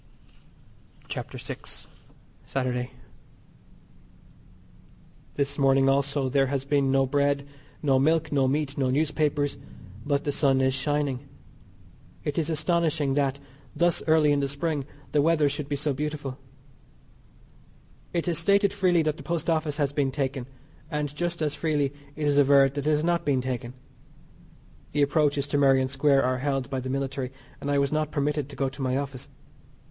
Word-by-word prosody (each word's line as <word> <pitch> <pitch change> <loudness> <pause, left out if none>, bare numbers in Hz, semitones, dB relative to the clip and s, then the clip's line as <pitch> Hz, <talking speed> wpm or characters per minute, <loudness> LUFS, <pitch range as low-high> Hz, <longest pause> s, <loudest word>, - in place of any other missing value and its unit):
CHAPTER - - -5
VI. - - -6 0.9
SATURDAY. 125 -2 -2 2.5
This 140 0 -1
morning 135 0 +4
also 140 0 +1
there 135 +1 +2
has 135 0 -2
been 140 -1 +2
no 135 0 +3
bread, 140 +1 +1 0.4
no 135 -3 +3
milk, 155 +3 +2
no 135 -2 +3
meat, 145 +1 -1
no 130 -2 +2
newspapers, 145 0 0 0.5
but 145 0 0
the 145 - 0
sun 140 -2 +2
is 130 0 +2
shining. 140 -1 -1 0.9
It 150 +2 -1
is 160 -1 -1
astonishing 155 -3 +1
that, 140 -1 0 0.4
thus 175 -1 +2
early 155 -2 +5
in 145 - +3
the 140 - 0
Spring, 145 0 -2 0.3
the 150 - +3
weather 155 -1 +3
should 145 0 -3
be 145 - 0
so 145 0 -1
beautiful. 145 -1 -4 1.7
It 170 0 -1
is 170 -2 +1
stated 200 +3 +3
freely 180 -4 +3
that 155 0 -1
the - - -9
Post 170 -1 -1
Office 155 -2 0
has 145 -2 0
been 140 -2 +1
taken, 135 -2 -2 0.4
and 150 -2 -3
just 170 0 -2
as 150 -2 0
freely 145 -3 0 0.2
it 150 - -3
is 145 -1 +3
averred 140 -1 +5
that 145 0 -3
it - - +4
has 150 0 +2
not 170 0 +1
been 140 -3 +2
taken. 125 -1 -4 1.2
The 145 0 +3
approaches 145 -1 +2
to 145 - +1
Merrion 135 -2 +4
Square 135 +1 +3
are 130 0 0
held 135 -1 -2
by 135 - -1
the 130 0 -5
military, 135 -1 -2 0.3
and 140 - -3
I 145 - +2
was 140 -1 +1
not 155 -1 0
permitted 145 -1 -1
to 140 - -9
go 135 - 0
to 135 +1 -7
my 130 0 0
office. 135 -2 -5
145 Hz, 165 wpm, -26 LUFS, 135-150 Hz, 2.5 s, early